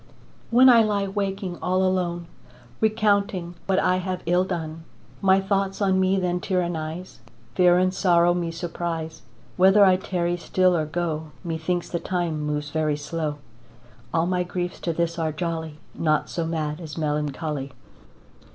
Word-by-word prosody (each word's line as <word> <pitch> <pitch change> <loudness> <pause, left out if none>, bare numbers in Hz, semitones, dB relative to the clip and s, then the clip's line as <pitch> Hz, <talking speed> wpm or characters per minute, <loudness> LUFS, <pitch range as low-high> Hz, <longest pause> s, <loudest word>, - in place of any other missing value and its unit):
When 250 +3 +6
I 240 -3 +8
lie 205 -2 +1
waking 195 -2 -3
all 185 +1 +1
alone, 180 -2 0 0.5
Recounting 200 -5 +1
what 190 -1 +2
I 185 -1 +3
have 185 0 -3
ill 175 +2 +3
done, 165 -3 -4 0.4
My 190 0 +5
thoughts 195 0 -1
on 190 -2 +2
me 190 +1 +2
then 180 -1 0
tyrannise, 175 -3 -3 0.3
Fear 180 -1 +5
and 185 0 +2
sorrow 175 -2 +4
me 175 -1 -2
surprise, 165 -1 -4 0.4
Whether 195 +2 +6
I 185 -1 +5
tarry 175 -2 -1
still 185 +1 +2
or 155 -2 0
go, 160 -1 -2 0.2
Methinks 170 +1 -2
the 170 - -3
time 175 -4 -2
moves 150 0 -3
very 155 -1 0
slow. 150 0 -3 0.8
All 165 0 +1
my 180 0 0
griefs 180 0 -4
to 170 - -2
this 170 +1 -1
are 160 -1 0
jolly, 160 -1 -4 0.2
Naught 155 -2 0
so 165 -2 -2
mad 155 -1 -3
as 155 -2 -8
melancholy. 150 -2 -2
175 Hz, 150 wpm, -24 LUFS, 160-185 Hz, 0.8 s, I